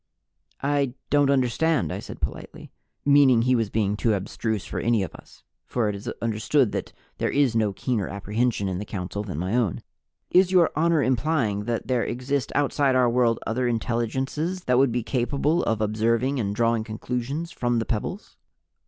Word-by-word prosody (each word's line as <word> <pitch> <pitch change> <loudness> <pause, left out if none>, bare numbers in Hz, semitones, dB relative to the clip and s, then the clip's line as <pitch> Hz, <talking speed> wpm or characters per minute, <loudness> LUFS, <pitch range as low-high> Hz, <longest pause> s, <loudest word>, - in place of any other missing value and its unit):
"I 140 -3 +1 0.2
don't 145 -1 +4
understand." 135 - +1
I - - -4
said - - -9
politely. - - -6 0.3
(Meaning 140 -5 +5
he 130 +1 +3
was 115 -4 +1
being 105 -2 0
too 110 0 +1
abstruse 105 +2 -3
for - - -4
any 115 -3 +2
of 90 - -6
us, - - -16 0.2
for 115 -4 0
it 105 - -3
is 100 - -5
understood 115 +2 +1
that - - -4 0.3
there - - +1
is 140 -5 +2
no 110 -2 +2
keener 105 +1 -2
apprehension 105 +2 -1
in 95 -1 -2
the - - -3
council 100 +1 -4
than 95 -7 -6
my 90 +7 -1
own.) 115 -8 0 0.5
"Is 185 0 +5
Your 180 -3 +4
Honor 160 -1 +3
implying 125 -6 0
that 115 -1 -2
there 125 -2 +1
exist 130 +2 -2
outside 140 -2 +2
our 125 -2 +4
world 120 -2 +2
other 125 +3 0
intelligences 130 +9 -2
that 125 0 +2
would 135 -2 +4
be 120 0 -1
capable 140 +7 0
of 110 -1 0
observing 115 +5 +1
and 100 -3 -2
drawing 115 0 +1
conclusions 125 +8 -4
from 120 -1 -1
the 115 - 0
pebbles?" 125 - -4
120 Hz, 180 wpm, -25 LUFS, 110-140 Hz, 0.5 s, Meaning